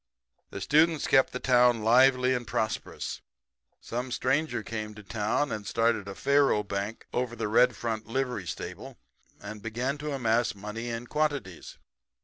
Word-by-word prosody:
"The -, -, -7 dB
students 155 Hz, 0 st, +3 dB
kept 135 Hz, -, +4 dB
the 125 Hz, -, -4 dB
town 125 Hz, -3 st, +4 dB
lively 125 Hz, +2 st, +5 dB
and 120 Hz, -2 st, -3 dB
prosperous. 110 Hz, -, -3 dB, 0.6 s
Some 125 Hz, +2 st, -5 dB
stranger 135 Hz, 0 st, 0 dB
came 105 Hz, 0 st, -5 dB
to 105 Hz, -, -11 dB
town 110 Hz, +7 st, -1 dB
and 105 Hz, -1 st, -4 dB
started 115 Hz, -3 st, +1 dB
a 100 Hz, -, -6 dB
faro 140 Hz, -5 st, +3 dB
bank 100 Hz, +2 st, -4 dB
over 125 Hz, -1 st, -1 dB
the 105 Hz, -, -2 dB
Red 120 Hz, +3 st, +4 dB
Front 110 Hz, -1 st, -4 dB
livery 125 Hz, -6 st, -2 dB
stable, -, -, -7 dB, 0.4 s
and 105 Hz, 0 st, -8 dB
began 125 Hz, +6 st, -3 dB
to 150 Hz, +1 st, -4 dB
amass 120 Hz, -4 st, +1 dB
money 105 Hz, +4 st, -6 dB
in 115 Hz, +1 st, -4 dB
quantities. 145 Hz, -, -3 dB
120 Hz, 150 wpm, -28 LUFS, 110-130 Hz, 0.6 s, lively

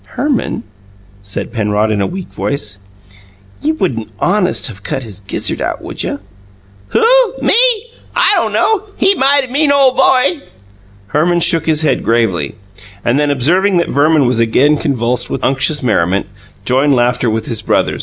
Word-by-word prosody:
"Herman," 260 Hz, -3 st, -2 dB, 0.6 s
said 100 Hz, 0 st, -4 dB
Penrod, 105 Hz, -1 st, 0 dB
in 105 Hz, -2 st, -1 dB
a 100 Hz, -, 0 dB
weak 185 Hz, 0 st, -7 dB
voice, 140 Hz, -9 st, -3 dB, 0.8 s
"you 310 Hz, +2 st, 0 dB
wouldn't 115 Hz, -, -3 dB
HONEST 185 Hz, -, +2 dB
of 100 Hz, -2 st, -14 dB
cut 130 Hz, -, -4 dB
his 105 Hz, -5 st, -6 dB
gizzard 95 Hz, -2 st, -2 dB
out, -, -, -3 dB
would -, -, -6 dB
you?" -, -, -3 dB, 0.7 s
"Who? -, -, +1 dB, 0.3 s
Me? -, -, +2 dB, 0.6 s
I -, -, +3 dB
don' -, -, +1 dB
know. 425 Hz, -2 st, +1 dB
He 390 Hz, -, +3 dB
mighty 275 Hz, -4 st, +2 dB
mean 285 Hz, +2 st, +2 dB
ole 275 Hz, -2 st, +4 dB
boy!" 265 Hz, +4 st, +2 dB, 0.7 s
Herman 170 Hz, -, +1 dB
shook 165 Hz, 0 st, +3 dB
his 155 Hz, -1 st, +2 dB
head 155 Hz, -, 0 dB
gravely, 105 Hz, -10 st, 0 dB, 0.5 s
and 120 Hz, +4 st, +1 dB
then, 150 Hz, 0 st, +1 dB
observing 175 Hz, +8 st, +2 dB
that 170 Hz, -, 0 dB
Verman 145 Hz, 0 st, +2 dB
was 125 Hz, -1 st, +1 dB
again 130 Hz, +6 st, +3 dB
convulsed 125 Hz, -5 st, -1 dB
with -, -, -4 dB
unctuous 135 Hz, +2 st, +1 dB
merriment, 100 Hz, -5 st, 0 dB, 0.4 s
joined 135 Hz, +2 st, +2 dB
laughter 120 Hz, 0 st, +1 dB
with 110 Hz, 0 st, -2 dB
his 115 Hz, -3 st, -1 dB
brother. -, -, 0 dB
140 Hz, 160 wpm, -14 LUFS, -, 0.8 s, ole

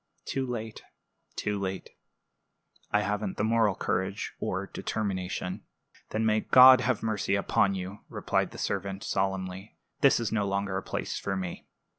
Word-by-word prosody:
"Too 130 Hz, -1 st, -2 dB
late, 115 Hz, -3 st, -5 dB, 0.5 s
too 105 Hz, -1 st, -2 dB
late. 95 Hz, -1 st, -4 dB, 1.0 s
I 105 Hz, -, +2 dB
haven't 105 Hz, 0 st, -2 dB
the -, -, 0 dB
moral 110 Hz, -3 st, +3 dB
courage 95 Hz, +3 st, -2 dB
or -, -, -2 dB
determination." 95 Hz, -3 st, -3 dB, 0.5 s
"Then 110 Hz, +1 st, -1 dB
may 110 Hz, 0 st, +3 dB
God 130 Hz, +2 st, +8 dB
have 125 Hz, -3 st, 0 dB
mercy 105 Hz, -3 st, 0 dB
upon 100 Hz, 0 st, +2 dB
you!" 95 Hz, +2 st, -6 dB
replied -, -, 0 dB
the -, -, -11 dB
servant, 100 Hz, 0 st, -3 dB
solemnly. 95 Hz, +1 st, -2 dB, 0.2 s
"This 140 Hz, -, +5 dB
is 115 Hz, -2 st, -2 dB
no 105 Hz, -3 st, 0 dB
longer 100 Hz, 0 st, -1 dB
a 95 Hz, -, -1 dB
place -, -, -4 dB
for 95 Hz, -1 st, -2 dB
me." 90 Hz, -2 st, -5 dB
100 Hz, 150 wpm, -28 LUFS, 95-110 Hz, 1.0 s, God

